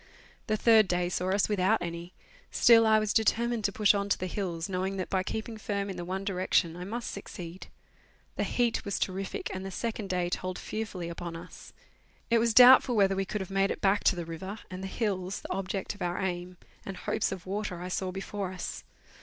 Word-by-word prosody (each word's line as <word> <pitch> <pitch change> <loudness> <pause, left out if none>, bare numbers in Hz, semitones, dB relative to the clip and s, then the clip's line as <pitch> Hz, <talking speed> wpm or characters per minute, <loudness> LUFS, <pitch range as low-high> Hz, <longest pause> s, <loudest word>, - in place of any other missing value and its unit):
The 215 - +1
third 220 -2 +6
day 175 0 0
saw 180 +1 -1
us 195 +1 +2
without 205 +1 +2
any; 170 0 -5 0.4
still 225 -1 +6
I 220 0 +6
was 215 -1 0
determined 230 +1 +1
to 200 - +2
push 210 +1 +4
on 200 0 -1
to - - +2
the 185 - -3
hills, 175 -3 -3
knowing 190 +1 -2
that 185 - -4
by 190 - +2
keeping 220 +3 -4
firm 200 -2 -2
in - - -6
the 175 - -5
one 190 +2 -4
direction 180 -3 +1
I 180 +1 -6
must 235 +4 -4
succeed. 180 -2 -8 0.7
The - - -1
heat 240 -2 0
was 200 - -2
terrific, 190 0 -3
and 190 0 -5
the 195 - -5
second 215 0 -4
day 180 -1 0
told 185 0 -3
fearfully 215 -6 -5
upon 170 0 -6
us. 170 +2 -11 0.6
It 230 - +5
was 230 -1 +1
doubtful 250 0 +8
whether 195 -2 +4
we 195 0 -1
could 210 +1 -3
have 190 - -6
made 195 0 +1
back 200 +1 +3
to - - +5
the 175 -1 -4
river; 190 +5 -6
and 185 0 -6
the 190 - -4
hills, 190 -2 -2
tlie - - -3
object 195 0 -3
of 205 - -16
our 175 0 -1
aim, 180 -1 -3 0.3
and 195 -2 -6
hopes - - -1
of 190 -2 -6
water 195 -2 -3
I 180 +1 -5
saw 185 +1 -2
before 195 0 -4
us. 185 - -6
195 Hz, 215 wpm, -29 LUFS, 180-210 Hz, 0.7 s, doubtful